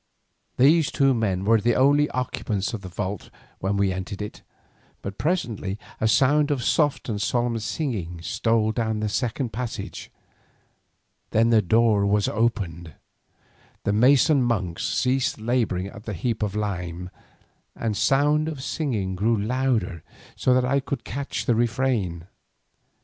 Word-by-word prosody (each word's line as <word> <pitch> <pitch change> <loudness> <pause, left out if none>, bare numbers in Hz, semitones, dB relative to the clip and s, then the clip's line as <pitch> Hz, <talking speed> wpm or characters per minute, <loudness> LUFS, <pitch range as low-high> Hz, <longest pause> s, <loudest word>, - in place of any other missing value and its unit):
These 150 +4 +5
two 135 -2 +3
men 100 -5 -1
were 110 0 +4
the 120 +1 +2
only 145 +3 +4
occupants 115 -4 -2
of 110 - -4
the 95 - -8
vault 95 +1 -4 0.3
when 95 +2 -1
we 100 -1 +2
entered 95 +2 -5
it, 105 0 -6 0.6
but 100 0 -6
presently 115 - -1 0.2
a 110 - +2
sound 145 +7 +3
of 140 -4 0
soft 145 -3 +1
and 105 -4 -2
solemn 120 +2 0
singing 105 - -3
stole 115 +3 +1
down 110 -1 -1
the 105 - -1
second 120 +1 -2
passage. 120 +1 -5 1.2
Then 115 +2 +3
the 110 -2 +5
door 110 +1 +3
was 105 0 +2
opened, 90 -8 -2 0.9
the 105 - +1
mason 135 +5 +5
monks 105 -8 -1
ceased 130 -2 0
labouring 110 -5 0
at 105 +2 -10
the 105 - -4
heap 115 +6 -2
of 105 -1 -1
lime, 90 -4 -3 0.6
and 115 -2 -2
the 100 - -4
sound 150 +3 +3
of 150 -5 -5
singing 115 - -2
grew 110 +4 +1
louder 115 -6 0 0.3
so 125 - +2
that 130 0 +3
I 140 +2 +2
could 135 -3 -4
catch 140 +4 -4
the 120 - +3
refrain. 115 -7 0
115 Hz, 150 wpm, -24 LUFS, 100-130 Hz, 1.2 s, These